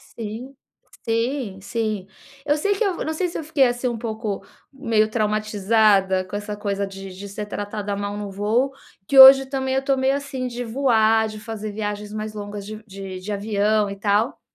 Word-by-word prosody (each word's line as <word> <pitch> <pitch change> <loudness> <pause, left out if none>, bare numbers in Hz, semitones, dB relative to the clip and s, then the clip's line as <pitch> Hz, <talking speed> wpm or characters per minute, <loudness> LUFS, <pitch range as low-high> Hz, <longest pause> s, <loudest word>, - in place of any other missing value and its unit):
Sim, 230 +5 -7 0.5
sim, 230 -3 -1
sim. 215 -3 -3 0.4
Eu 295 +1 +2
sei 405 +7 +1
que 455 - 0
eu 390 -4 0
não 315 - -2
sei 360 +3 -1
se 340 - -6
eu - - -4
fiquei 290 -3 +3
assim 245 +1 -1
um 235 -2 -2
pouco 220 -3 -4 0.3
meio 225 -6 +1
traumatizada 210 -3 +2
com 195 - -7
essa 205 0 -4
coisa 200 -1 -2
de 195 0 -9
de 200 +2 -8
ser 210 +1 -5
tratada 205 0 -4
mal 205 0 -4
no 205 -1 -5
voo, 220 +7 +1 0.4
que 270 - +5
hoje 270 0 +11
também 265 -1 -2
eu 265 - +2
tô 270 -1 +1
meio 265 +1 +2
assim 270 -2 -4
de 245 0 -5
voar, 225 -3 +3
de 215 0 -8
fazer 215 -1 -6
viagens 210 0 -4
mais 215 0 -4
longas 205 -1 -6
de 215 +1 -8
de 190 -1 -7
de 205 +3 -6
avião 205 0 +1
e 200 - -5
tal. 205 +4 +1
215 Hz, 195 wpm, -22 LUFS, 205-255 Hz, 0.5 s, hoje